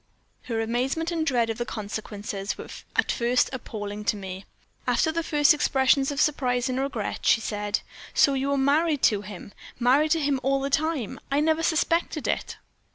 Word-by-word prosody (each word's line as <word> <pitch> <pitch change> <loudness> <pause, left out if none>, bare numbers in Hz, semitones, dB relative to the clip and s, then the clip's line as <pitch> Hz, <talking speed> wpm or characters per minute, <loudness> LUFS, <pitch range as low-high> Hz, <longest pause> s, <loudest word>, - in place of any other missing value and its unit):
"Her 230 -2 -2
amazement 260 +9 -1
and 330 -2 0
dread 235 -4 +2
of 225 - -6
the - - +1
consequences 205 -2 -5
were - - -9 0.3
at - - +2
first 245 +1 +1
appalling 210 -4 -5
to 210 - +1
me. 190 -1 -7 0.4
After 320 - +2
the 335 +1 -1
first 300 -1 +4
expressions 270 -2 +2
of 285 -1 -3
surprise 255 -5 +1
and 255 0 -1
regret, 265 -6 -3
she - - +4
said: 210 -1 -2 0.3
"'So 280 - +5
you 270 +1 -1
were 280 - +1
married 290 +2 +2
to 205 -3 +4
him 200 0 -10 0.3
married 265 +6 +4
to 330 - 0
him 285 -3 +1
all 275 +1 +1
the 275 +1 -3
time? 310 -6 -1
I 280 - +3
never 315 +1 +2
suspected 325 -1 0
it.' - - -2
265 Hz, 180 wpm, -26 LUFS, 220-295 Hz, 0.4 s, So